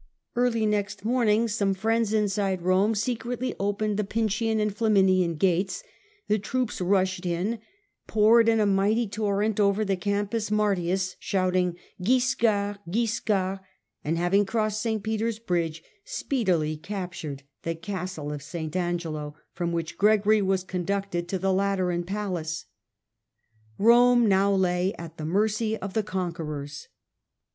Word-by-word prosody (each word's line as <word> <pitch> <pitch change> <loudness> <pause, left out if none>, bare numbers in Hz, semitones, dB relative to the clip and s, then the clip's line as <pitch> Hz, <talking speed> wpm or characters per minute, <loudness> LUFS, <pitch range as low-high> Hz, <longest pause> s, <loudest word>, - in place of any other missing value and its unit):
Early 240 -2 +2
next 205 -1 -1
morning 230 -2 +2
some 200 -3 0
friends 225 +2 +1
in 215 -1 +3
Ro£r?^i8 195 -1 0
®^^® - - -15
Rome 190 +5 +3
secretly 240 +3 -2
opened 205 +1 -1
the 210 - +1
Pincian 220 +1 0
and 210 -1 0
card's - - -27
troops 220 -2 +3 0.2
Flamiuian 175 -3 +1
gates, 190 - +1 0.4
the 210 +1 +2
troops 240 +1 -2
rushed 185 0 +1
in, 180 +6 -1 0.5
poured 225 +2 +5
in 225 -1 +3
a 210 - +3
mighty 205 +4 +2
torrent 210 +1 -1
over 205 +1 +3
the 195 -1 +1
Campus 205 +3 -1
Martius, 190 -3 0
shouting 185 -2 0 0.2
'Wiscard! 210 -2 +1
Wiscard!' 200 -2 0 0.4
and, 160 +3 -1
having 175 +4 +3
crossed 215 0 -1
St. 220 -3 -1
Peter's 220 +1 -1
bridge, 170 -7 -2 0.2
speedily 190 - -1
captured 165 -6 -6 0.2
the 165 0 -3
castle 180 -4 -5
of 145 - -6
St. 155 +2 -6
Angelo, 165 -4 -2 0.2
from 175 -1 -2
which 165 -1 -4
Gregory 210 +1 +4
was 190 -1 +1
conducted 185 -1 -2
to 190 - -1
the 190 +1 +1
Lateran 185 -3 0
palace, 180 -5 -3 1.1
Rome 240 +1 +5
now 195 0 +3
lay 185 0 +1
at 165 -1 -9
the 155 - -4
mercy 215 +5 +1
of 195 -2 -6
the 220 - +2
conquerors. 160 -7 -5
200 Hz, 140 wpm, -26 LUFS, 180-215 Hz, 1.1 s, poured